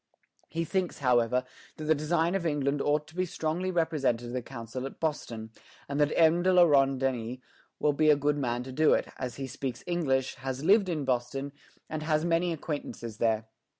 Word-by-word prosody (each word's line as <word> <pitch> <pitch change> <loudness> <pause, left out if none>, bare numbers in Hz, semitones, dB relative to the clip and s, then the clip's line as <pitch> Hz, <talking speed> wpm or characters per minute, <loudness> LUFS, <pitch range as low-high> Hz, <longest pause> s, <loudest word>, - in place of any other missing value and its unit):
" - - -39
He 165 - +1
thinks, 185 +1 -1
however, 125 -1 +2 0.3
that 155 - -6
the 155 +1 +4
design 160 +3 +1
of 195 -2 0
England 145 -3 0
ought 150 +1 +1
to 160 - -17
be 185 0 0
strongly 170 +2 -2
represented 140 -9 0
to - - -7
the 125 - -1
Council 115 +3 -6
at - - -12
Boston, 115 -8 -3 0.4
and 140 +1 -2
that 150 0 +3
M. 165 +1 +5
de 185 +1 +3
la 180 -1 +7
Ronde 135 -4 +4
Denys 125 -2 -1 0.4
will 150 - +2
be 155 +2 +3
a 150 - +7
good 145 +1 0
man 120 -2 -1
to 130 - -8
do 155 +4 +4
it, - - -2
as 125 -2 -4
he 135 - -4
speaks 130 -1 -5
English, 135 -8 0
has 135 +1 -4
lived 200 +1 +5
in 155 -5 -2
Boston, 130 +2 -1 0.4
and 155 0 -4
has 155 0 +1
many 170 +1 +2
acquaintances 140 -8 -5
there. 110 -1 +1
145 Hz, 205 wpm, -29 LUFS, 125-160 Hz, 0.4 s, la